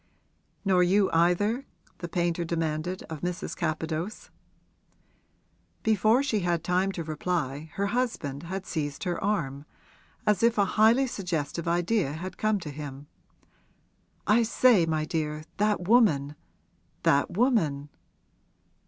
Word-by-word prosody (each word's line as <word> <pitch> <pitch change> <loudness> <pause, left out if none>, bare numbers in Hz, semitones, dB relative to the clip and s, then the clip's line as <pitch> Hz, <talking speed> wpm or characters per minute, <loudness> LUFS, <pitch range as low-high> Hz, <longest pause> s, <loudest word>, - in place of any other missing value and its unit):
'Nor 185 -2 +4
you 190 +2 +3
either?' 205 +10 +2 0.3
the 170 - -5
painter 175 0 0
demanded 165 +1 -2
of 160 -2 -8
Mrs. 180 0 -3
Capadose. 160 +3 -3 1.5
Before 220 +4 +3
she 230 -7 0
had 175 -3 0
time 180 +3 +1
to 175 -3 -4
reply 155 -2 -3
her 200 - 0
husband 200 - -2
had 190 +3 -5
seized 145 -5 -3
her 175 -2 -2
arm, 145 -9 -1 0.6
as 210 -1 +2
if 230 0 +3
a 200 - +4
highly 225 +5 +5
suggestive 170 - -3
idea 175 -2 +1
had 185 +4 -7
come 215 -1 +1
to 150 - -6
him. 145 -1 -8 1.2
'I 215 +4 +4
say, 230 -4 +4
my 155 -1 0
dear, 155 -1 -3
that 205 -3 +1
woman 160 - +4 0.7
that 140 +5 +2
woman!' 160 - +1
175 Hz, 125 wpm, -27 LUFS, 155-210 Hz, 1.5 s, highly